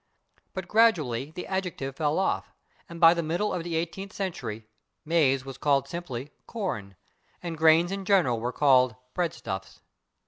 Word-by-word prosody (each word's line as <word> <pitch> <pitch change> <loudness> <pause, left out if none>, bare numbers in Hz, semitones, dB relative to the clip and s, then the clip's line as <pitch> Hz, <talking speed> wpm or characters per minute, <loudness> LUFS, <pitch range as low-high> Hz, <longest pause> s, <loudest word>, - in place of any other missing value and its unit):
But 185 -2 -4
gradually 155 - +3
the 180 +3 -7
adjective 180 -8 -3
fell 150 0 0
off, 190 - 0 0.4
and 170 0 -8
by 165 0 +8
the 170 - -1
middle 170 +6 -1
of 180 -2 -2
the 170 -1 -3
eighteenth 175 +4 -3
century 120 - -4 0.4
/maize/ 135 -5 +3
was 135 -1 -8
called 140 -2 +2
simply 140 -4 -6 0.2
/corn/, 120 - -4 0.5
and 170 -2 -4
grains 160 +3 +5
in 195 0 -3
general 180 - +3
were 120 +2 -2
called 130 -4 +4 0.2
/breadstuffs 155 - -4
160 Hz, 150 wpm, -27 LUFS, 135-180 Hz, 0.5 s, by